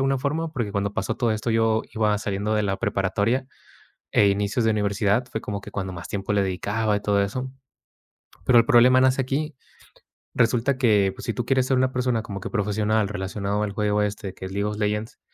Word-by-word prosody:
alguna 135 0 +1
forma, 155 +4 -2
porque 115 -7 -3
cuando 100 0 -1
pasó 115 - -2
todo 120 -3 +1
esto 110 +2 -3
yo 110 -1 +2
iba 105 -1 +2
saliendo 105 +1 -2
de 105 - +1
la 95 -1 0
preparatoria 105 +7 0 0.7
e 100 - +5
inicios 105 +4 0
de 110 - +3
universidad, 105 +3 +1
fue 110 - -3
como 100 -1 -4
que - - -10
cuando 95 -2 -4
más 85 -1 -8
tiempo 100 0 -3
le 100 -1 +2
dedicaba 105 +3 -1
y - - -2
todo 100 -1 +2
eso, 130 +6 -3 0.9
pero 125 -2 +6
el 115 - +5
problema 130 -1 +6
nace 130 +1 +3
aquí. 145 +4 -2 0.8
Resulta 125 +3 +2
que 105 -6 +3
pues - - -9
si 115 - -1
tú 120 -1 -3
quieres 130 0 +2
ser 135 - +2
una 130 0 +2
persona 125 -3 0
como 100 -2 -6
que - - -6
profesional 105 0 +1
relacionado 100 +1 -2
al 100 -2 -3
juego 105 0 +1
este 105 -2 -4
que 95 - -9
es 95 - -6
League 100 +1 -1
of 105 0 -3
Legends, 105 +1 -2
105 Hz, 210 wpm, -24 LUFS, 100-125 Hz, 0.9 s, pero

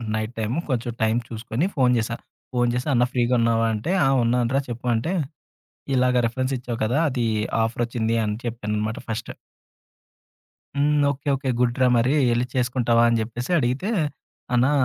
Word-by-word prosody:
Night 110 +2 -3
time, 110 +5 -1
కొంచెం 120 -2 -1
time 110 0 +2
చూసుకొని 115 +6 -2
phone 125 -4 +3
జేశా. 115 +1 -2 0.4
ఫోను 120 -1 +2
చేసి 125 +4 -2
"అన్నా 120 -1 +4
ఫ్రీగా 120 0 +1
ఉన్నావా?" 115 0 +2
అంటే, 110 +11 -2
"ఆ! - - +4 0.2
ఉన్నానురా 120 +3 +1
చెప్పు" 120 +1 -6
అంటే, 120 +10 -1 0.8
ఇలాగా 125 -1 +3
రిఫరెన్స్ 130 +3 -1
ఇచ్చావు 120 -2 -5
కదా! 120 +5 +1
అది 125 -3 -1 0.4
ఆఫరొచ్చింది 115 0 -1
అని 105 0 -1
చెప్పానన్నమాట 110 -2 -2
ఫస్ట్. 115 +1 -4 1.5
"హ్మ్. 145 +1 +3 0.2
ఓకే. 140 +1 -9
ఓకే. 135 0 -3
గుడ్ 120 -1 +1
రా! 130 - +6
మరి 120 +3 +2 0.2
ఎళ్లి 120 +1 +1
చేసుకుంటావా" 120 -2 +2
అని 115 -1 +2
చెప్పేసి 120 +6 -4
అడిగితే, 130 - -1 0.6
"అన్నా! 125 +3 +4
120 Hz, 155 wpm, -23 LUFS, 115-125 Hz, 1.5 s, రా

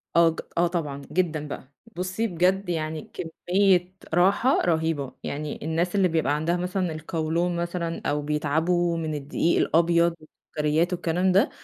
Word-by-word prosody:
آه 170 0 +6
ج 165 - -5 0.2
آه 175 +1 +4
طبعًا، 150 -5 -3
جدًا 160 -5 0
بقى، 145 -1 -8 0.2
بُصي 185 +5 -1
بجد 185 +1 +1
يعني 155 -2 -3
كمية 180 +2 +1 0.2
راحة 195 - +3
رهيبة، 160 -5 0
يعني 150 +1 -4
الناس 170 +4 0
اللي 195 -2 +4
بيبقى 160 -4 +1
عندها 165 +4 0
مثلًا 180 0 -1
القولون 160 +2 -1
مثلًا 170 -1 -3
أو 150 0 0
بيتعبوا 160 +4 +1
من 160 -2 -2
الدقيق 150 +4 0
الأبيض 170 +1 +3
والسكريات 155 +2 -1
والكلام 180 +1 +1
ده 200 - +4
170 Hz, 145 wpm, -25 LUFS, 155-180 Hz, 0.2 s, آه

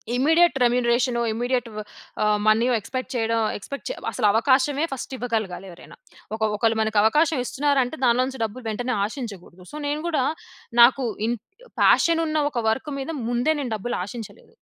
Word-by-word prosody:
Immediate 325 +5 +4
రెమ్యునరేషనో, 240 0 +2
immediate 245 +1 -1 0.6
ఆహ్, 210 0 +3
money 225 +3 +4
expect 255 +4 -5
చేయడం 230 0 0 0.2
expect 280 - -7 0.2
అసలు 235 - -1
అవకాశమే 270 +6 +2
ఫస్ట్ 265 - -6
ఇవ్వగలగాలి 220 -6 -3
ఎవరైనా. 175 - -13 0.4
ఒక 220 - -11
ఒకళ్ళు 225 +1 +1
మనకు 220 -1 +1
అవకాశం 300 +6 +3
ఇస్తున్నారంటే 275 +1 0
దానిలో 245 +1 +4
నుంచి 265 -3 -7
డబ్బులు 225 +3 -5
వెంటనే 245 +3 -2
ఆషించగూడదు. 200 -6 -8
సో - - -9
నేను 295 +1 -2
కూడా 300 -6 +1 0.6
నాకు 255 +2 +6 0.2
ఇన్ 240 0 -1 0.5
పాషన్ 330 -1 +4
ఉన్న 310 -1 -1
ఒక 245 - -3
వర్క్ 255 +7 -2
మీద 270 +4 -5 0.2
ముందే 245 +6 +1
నేను 250 -5 -4
డబ్బులు 220 +4 -3
ఆషించలేదు. 220 +2 -10
245 Hz, 150 wpm, -23 LUFS, 225-270 Hz, 0.6 s, నాకు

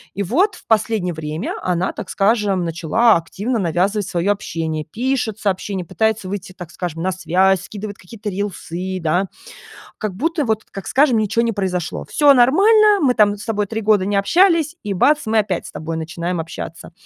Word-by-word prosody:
И 200 - -1
вот 355 - +1
в - - -17
последнее 215 -5 +1
время 155 +1 -4
она, 180 +1 -1
так 205 -4 -7
скажем, 200 -3 +1
начала 170 +7 +3
активно 210 +8 -3
навязывать 190 +4 0
свое 175 +4 0
общение: 165 -6 -3
пишет 230 - -2
сообщения, 195 -3 -2
пытается 220 0 -1
выйти, 195 -1 -6
так 180 -3 -10
скажем, 170 -2 -5
на 190 - +1
связь, 185 +1 +2
скидывает 205 +1 -8
какие-то 205 +2 -7
рилсы, 190 -2 -4
да, 175 +4 0 0.7
как 205 -3 -5
будто 325 +1 0
вот, 220 -3 -1
как 195 - -9
скажем, 265 -4 +3
ничего 215 +2 +1
не 230 -1 0
произошло. 180 -4 -2
Всё 290 -2 +5
нормально, 405 - +5
мы 265 -6 +3
там 205 -2 +3
с 205 - -9
тобой 210 -3 -1
3 220 +1 -3
года 210 -3 +2
не 200 0 0
общались, 335 - +3
и 205 -2 -2
бац- 295 +11 +3
мы 220 0 +1
опять 200 -5 -1
с - - -10
тобой 160 +1 -5
начинаем 170 +2 -3
общаться. 165 +1 -8
200 Hz, 180 wpm, -19 LUFS, 180-225 Hz, 0.7 s, Всё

